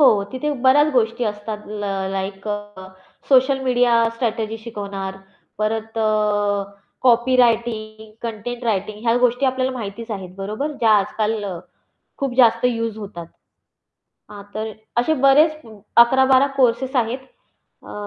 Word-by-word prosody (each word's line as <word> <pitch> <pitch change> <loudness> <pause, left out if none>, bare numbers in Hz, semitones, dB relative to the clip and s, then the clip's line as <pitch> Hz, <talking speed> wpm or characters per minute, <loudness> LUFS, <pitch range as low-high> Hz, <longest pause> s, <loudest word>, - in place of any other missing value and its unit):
हो, 210 -8 +5
तिथे 280 +4 -2
बऱ्याच 275 +3 +5
गोष्टी 235 -1 +1
असतात 210 0 -5
ल 210 -1 -5 0.3
लाइक 195 +1 -5
अ, 205 -2 -6 0.4
सोशल 270 0 +4
मीडिया 245 -1 +2 0.2
स्ट्रॅटेजी 225 -2 -2
शिकवणार, 200 -4 -6 0.4
परत 220 +1 -2
अ, 210 -2 +1 0.4
कॉपी 250 0 +4
रायटिंग, 220 -3 0
कंटेंट 235 +2 -5
रायटिंग 210 -1 -1
ह्या 230 - +3
गोष्टी 250 +2 +2
आपल्याला 260 0 0
माहितीच 230 -1 -7
आहेत 185 -3 -6
बरोबर. 215 +10 -4
ज्या 225 -2 +4
आजकाल 215 +1 -2 0.7
खूप 275 -3 -2
जास्त 230 -2 +4
युज 230 -3 0
होतात. 185 -5 -8 1.0
हां, 205 -1 -9
तर 220 0 -4 0.3
असे 315 +6 +1
बरेच 305 +3 +5 0.4
11-12 265 +3 +6
कोर्सेस 255 +1 +1
आहेत 240 +2 0 0.7
अ, - - -9
225 Hz, 125 wpm, -21 LUFS, 210-250 Hz, 1.0 s, 11-12